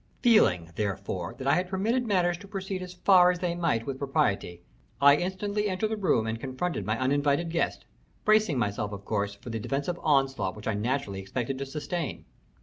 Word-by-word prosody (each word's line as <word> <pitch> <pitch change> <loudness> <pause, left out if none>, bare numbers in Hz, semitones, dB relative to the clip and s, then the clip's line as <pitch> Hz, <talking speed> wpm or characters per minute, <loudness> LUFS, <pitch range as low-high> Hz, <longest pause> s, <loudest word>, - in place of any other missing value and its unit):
Feeling, 90 - +4
therefore, 100 -4 -3
that 130 - -7
I 140 - +4
had 180 0 0
permitted 225 +6 0
matters 180 -4 +2
to 200 - -12
proceed 195 -1 -4
as 180 0 -8
far 180 -1 +6
as 180 - +1
they 175 -1 -1
might 165 -10 0
with 135 -1 -4
propriety, 120 - -1 0.4
I 140 0 +7
instantly 200 +5 -1
entered 195 +3 -1
the - - +1
room 180 - +1
and 110 0 -3
confronted 135 +6 -3
my 110 +1 0
uninvited 145 +5 +1
guest, 170 - -1 0.4
bracing 215 -8 +4
myself, 105 -2 -1
of 100 0 -8
course, 100 -1 -1
for 115 +4 -9
the 115 - -3
defensive 145 +9 -2
onslaught 135 - +1
which 105 - -8
I 110 - +1
naturally 105 -2 -2
expected 125 +7 -3
to 135 - -4
sustain. 145 - -4
140 Hz, 190 wpm, -28 LUFS, 110-180 Hz, 0.4 s, I